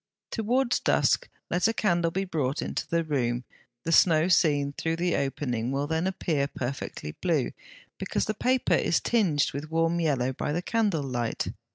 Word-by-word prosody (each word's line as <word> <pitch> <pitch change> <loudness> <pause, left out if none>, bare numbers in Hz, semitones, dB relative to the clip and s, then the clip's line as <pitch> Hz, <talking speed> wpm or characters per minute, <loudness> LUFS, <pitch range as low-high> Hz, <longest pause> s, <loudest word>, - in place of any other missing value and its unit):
Towards 245 +3 +1
dusk - - +2 0.2
let 180 +4 +3
a 225 - +1
candle 175 -6 +2
be 190 +4 -2
brought 150 -6 -1
into - - -3
the 170 0 +1
room; 125 -5 -1 0.4
the 165 - -2
snow 165 0 +5
seen 145 -6 +3
through 160 +3 -1
the 175 +1 0
opening 125 -4 -1
will 140 +1 0
then 160 +4 0
appear 155 -6 0
perfectly 125 - -5
blue, 155 - 0 0.5
because - - -1
the 215 - -1
paper 250 -2 +1
is 165 - +2
tinged 175 -11 +2
with 145 +3 -5
warm 165 +1 +1
yellow 135 -6 +1
by 145 - -3
the 175 +3 -2
candle 205 -8 +1
light. 120 -4 -2
160 Hz, 170 wpm, -27 LUFS, 140-180 Hz, 0.5 s, snow